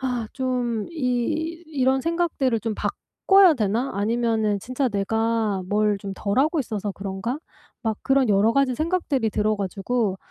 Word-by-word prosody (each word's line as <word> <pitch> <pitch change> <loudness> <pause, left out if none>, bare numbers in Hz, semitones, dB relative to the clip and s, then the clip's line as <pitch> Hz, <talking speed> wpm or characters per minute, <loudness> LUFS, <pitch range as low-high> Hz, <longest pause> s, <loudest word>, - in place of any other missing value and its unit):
'아 250 -4 -2
좀 245 -4 -1
이 315 +4 -1
이런 265 -3 +1
생각들을 320 -8 0
좀 220 0 -2
바꿔야 385 - +3
되나? 225 +3 0
아니면은 220 0 +1
진짜 255 +3 -1
내가 220 -1 0
뭘 210 0 +2
좀 195 0 -6
덜 200 +4 -1
하고 310 +4 +2
있어서 210 -4 -3
그런가?' 195 +7 -4 0.4
막 220 -2 -1
그런 270 -3 +3
여러 205 +3 +4
가지 275 -1 +2
생각들이 310 -6 0
들어 210 +1 +1
가지고 200 +2 -1
235 Hz, 290 characters per minute, -24 LUFS, 210-270 Hz, 0.4 s, 여러